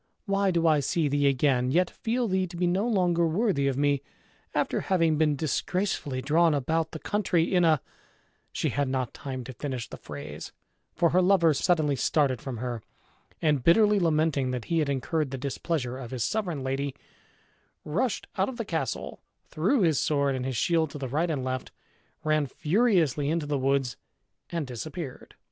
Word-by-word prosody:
why 200 -1 +1
do 170 -2 +1
I 155 -2 +5
see 155 +3 0
thee 145 0 +2
again, 130 -2 +2
yet 175 +6 +2
feel 240 0 -1
thee 190 -1 0
to 170 0 -9
be 180 - +1
no 185 +6 +1
longer 175 -6 +2
worthy 165 -5 +1
of 135 -1 0
me, 145 -1 +2 0.5
after - - 0
having 165 -4 +2
been 150 -2 +3
disgracefully 150 -2 -1
drawn 160 0 +3
about 160 +4 0
the 160 - -7
country 180 -2 0
in 180 -1 +4
a 160 -3 +4 0.4
" - - -40
She - - -1
had 140 -1 -1
not 130 -2 -2
time 130 -2 -6
to 130 - -8
finish 130 -2 -4
the - - -9
phrase, - - -8 0.4
for 170 -2 +3
her 185 - +4
lover 180 -4 +4
suddenly 150 -1 +2
started 130 -1 +1
from 130 -3 -5
her, 120 -1 -4 0.6
and, 150 -5 +2
bitterly 210 - +5
lamenting 155 -5 +1
that 125 -3 -3
he 165 -1 0
had 150 -3 0
incurred 140 +2 -1
the 135 - -4
displeasure 135 -1 -3
of 125 -3 -7
his 125 -3 -2
sovereign 175 - -2
lady, 135 +1 -2 0.9
rushed 210 +9 -1
out 190 - +2
of 255 - -7
the 230 - -3
castle, 160 - -3 0.3
threw 205 - +1
his 160 -6 +3
sword 140 -2 +1
and 130 0 -3
his 130 -3 -2
shield 160 +4 +2
to 145 - -8
the 135 -2 -4
right 155 +7 0
and 145 -5 -1
left, 130 0 -3 0.5
ran 155 -2 +2
furiously 160 - +2
into 165 -1 0
the 145 -1 -1
woods, 135 -1 0 0.5
and 170 -3 -2
disappeared. 135 +3 -7
155 Hz, 185 wpm, -27 LUFS, 135-175 Hz, 0.9 s, I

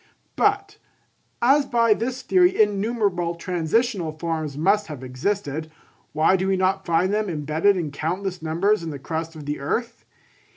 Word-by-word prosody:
But, 410 0 +1 0.6
as 275 +3 +4
by 230 -3 +4
this 250 +4 -4
theory 360 -5 +3
innumerable 205 -4 +1
transitional 175 +1 -1
forms 155 -3 -3
must 200 +6 +2
have 145 -5 -8
existed, 150 +3 -3 0.4
why 155 +5 +3
do 190 0 -1
we 195 -1 +2
not 190 +1 0
find 170 +4 +2
them 210 -1 0
embedded 160 +5 +1
in 160 -5 -3
countless 180 +5 -3
numbers 175 +6 +1
in 165 - -5
the 145 - -5
crust 160 +3 -5
of 150 -2 -9
the 145 +1 -3
earth? 230 - -3
185 Hz, 155 wpm, -23 LUFS, 160-215 Hz, 0.6 s, as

